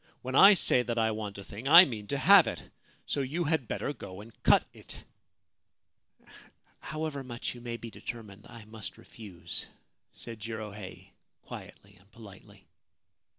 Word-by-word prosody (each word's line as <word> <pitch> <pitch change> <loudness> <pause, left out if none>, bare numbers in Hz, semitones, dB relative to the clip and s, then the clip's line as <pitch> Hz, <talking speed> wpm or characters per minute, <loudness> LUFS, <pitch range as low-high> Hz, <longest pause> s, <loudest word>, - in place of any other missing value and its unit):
* - - -39
When 130 +1 -5
I 195 +8 +8
say 130 -7 +3
that 120 -1 -4
I 110 -1 +2
want 105 -2 -5
a 100 - -8
thing 110 +7 -8
I 170 +4 +10
mean 110 - -7
to 140 - -2
have 185 +7 +7
it: - - -6 0.3
so 140 - -2
you 150 +7 -2
had 155 -6 -1
better 145 - -3
go 95 -8 -10
and 110 +2 -12
cut - - +5
it.' - - -12 0.9
' - - -24
However 155 -2 -5
much 120 -2 -5
you 120 - -12
may 120 -1 -5
be 115 -1 -9
determined, 105 -4 -9
I 115 -2 -12
must 110 -3 -8
refuse/ 100 -7 -8 0.4
said 115 -2 -10
Jirohei, 105 -3 -8 0.3
quietly - - -12
and 100 +2 -26
politely. 105 -3 -15
115 Hz, 165 wpm, -29 LUFS, 105-135 Hz, 0.9 s, I